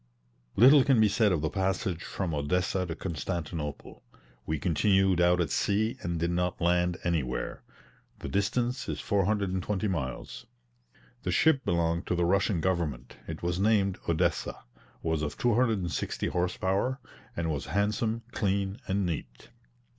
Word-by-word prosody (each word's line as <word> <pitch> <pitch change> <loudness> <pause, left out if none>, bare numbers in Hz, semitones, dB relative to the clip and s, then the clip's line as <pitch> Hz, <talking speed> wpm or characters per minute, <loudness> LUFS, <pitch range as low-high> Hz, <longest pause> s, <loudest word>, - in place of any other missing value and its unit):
Little 130 +6 +8
can 135 -4 +4
be 110 - +6
said 105 0 +3
of 85 -5 +1
the 80 - 0
passage 95 -2 -1
from 90 -4 -3
Odessa 90 +5 0
to 80 - -4
Constantinople; 85 -3 -5 0.5
we 80 - 0
continued 95 +3 +2
out 90 0 +4
at 85 - 0
sea 110 +4 +1
and 85 -1 -2
did 85 +1 0
not 90 0 -1
land 90 +1 +2
anywhere. 75 -8 -2 0.6
The - - -7
distance 120 - -1
is - - -3
420 100 0 0
miles. 75 -10 -4 0.7
The - - -3
ship 140 -5 +3
belonged 85 0 0
to - - 0
the 85 0 +1
Russian 95 0 +2
government, 80 -9 -2
it - - -6
was 85 +1 -1
named 100 -2 +2
Odessa, 80 -1 0 0.4
was 80 -2 0
of 75 -1 -3
260 115 -7 0
horse 90 0 -1
power, 100 +8 0 0.4
and 80 -1 -1
was 75 -3 -4
handsome, 105 +6 0
clean, 100 0 -1
and 100 -1 0
neat. 75 -8 -5
90 Hz, 145 wpm, -29 LUFS, 85-100 Hz, 0.7 s, Little